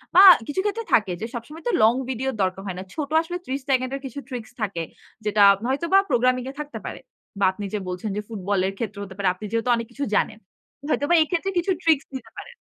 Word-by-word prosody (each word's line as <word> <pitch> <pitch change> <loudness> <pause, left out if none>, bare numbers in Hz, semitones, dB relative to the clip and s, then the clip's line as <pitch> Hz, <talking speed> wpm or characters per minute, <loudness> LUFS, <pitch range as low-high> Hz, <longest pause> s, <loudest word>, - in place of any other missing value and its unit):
বা 380 - +10 0.2
কিছু 295 +6 -2
ক্ষেত্রে 430 +2 -1
থাকে 205 -5 +4
যে - - -1
সবসময় 300 +8 -8
তো - - +2
লং 225 +2 +6 0.2
ভিডিওর 265 0 -2
দরকার 185 +1 -1
হয় 185 -1 -4
না। - - -5
ছোট 295 -2 -3
আসলে 350 +2 -4
৩০ 270 +1 -3
সেকেন্ডের 260 +1 0
কিছু 265 +2 -6
ট্রিকস 240 -3 -6
থাকে। 190 -5 -2 0.4
যেটা 210 0 +2 0.3
হয়তোবা 335 +8 +2
প্রোগ্রামিং 250 0 +2
এ - - -16
থাকতে 295 0 -7
পারে। - - -6 0.4
বা 195 - +4
আপনি 205 +1 -6
যে 210 - 0
বলছেন 180 +4 -4
যে - - -1
ফুটবলের 195 -2 -1
ক্ষেত্রে 210 -3 -4
হতে 190 -1 -9
পারে, 195 -2 0
আপনি 210 - -8
যেহেতু 230 +2 0
অনেক 230 -1 -4
কিছু 280 +2 -2
জানেন। 215 +1 0 0.5
হয়তোবা 300 +4 +2
এক্ষেত্রে 355 +4 -1
কিছু 380 +3 0
ট্রিকস 315 -4 +3
দিতে 235 -4 -7
পারেন। 485 0 -9
245 Hz, 215 wpm, -24 LUFS, 210-290 Hz, 0.5 s, বা